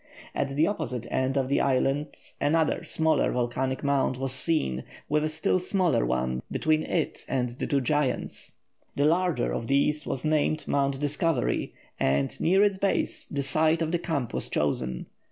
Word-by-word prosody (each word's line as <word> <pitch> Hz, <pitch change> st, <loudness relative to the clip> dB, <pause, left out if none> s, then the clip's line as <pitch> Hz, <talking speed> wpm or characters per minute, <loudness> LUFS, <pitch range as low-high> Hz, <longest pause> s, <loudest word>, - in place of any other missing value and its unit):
At 135 Hz, -, -2 dB
the 155 Hz, +3 st, +4 dB
opposite 125 Hz, -, -3 dB
end 130 Hz, +1 st, 0 dB
of 135 Hz, -1 st, +1 dB
the 140 Hz, -, +2 dB
island 135 Hz, +2 st, +1 dB, 0.3 s
another 155 Hz, +2 st, +2 dB
smaller 160 Hz, 0 st, +2 dB
volcanic 125 Hz, +2 st, -1 dB
mount 140 Hz, -2 st, +1 dB
was 135 Hz, 0 st, 0 dB
seen, 130 Hz, -, 0 dB, 0.2 s
with 150 Hz, +1 st, +1 dB
a 155 Hz, -, 0 dB
still 160 Hz, +4 st, 0 dB
smaller 180 Hz, -, +1 dB
one 65 Hz, 0 st, -1 dB
between 155 Hz, 0 st, +1 dB
it 160 Hz, 0 st, -2 dB
and 125 Hz, -1 st, 0 dB
the 120 Hz, -, -5 dB
two 140 Hz, -1 st, +1 dB
giants. 145 Hz, 0 st, -1 dB, 0.4 s
The 145 Hz, -, +2 dB
larger 165 Hz, -, +2 dB
of 115 Hz, -, -3 dB
these 145 Hz, +2 st, +1 dB
was 135 Hz, -, -3 dB
named 155 Hz, 0 st, +1 dB
Mount 140 Hz, -1 st, +1 dB
Discovery, 150 Hz, -2 st, 0 dB, 0.2 s
and, 70 Hz, 0 st, 0 dB
near 190 Hz, +4 st, +4 dB
its 200 Hz, -2 st, +2 dB
base, 195 Hz, -1 st, 0 dB
the 140 Hz, -1 st, -2 dB
site 155 Hz, +4 st, +2 dB
of 160 Hz, -, -2 dB
the 175 Hz, -, +1 dB
camp 145 Hz, -9 st, -2 dB
was 65 Hz, -, -1 dB
chosen. 65 Hz, -4 st, -1 dB
140 Hz, 170 wpm, -27 LUFS, 125-160 Hz, 0.4 s, the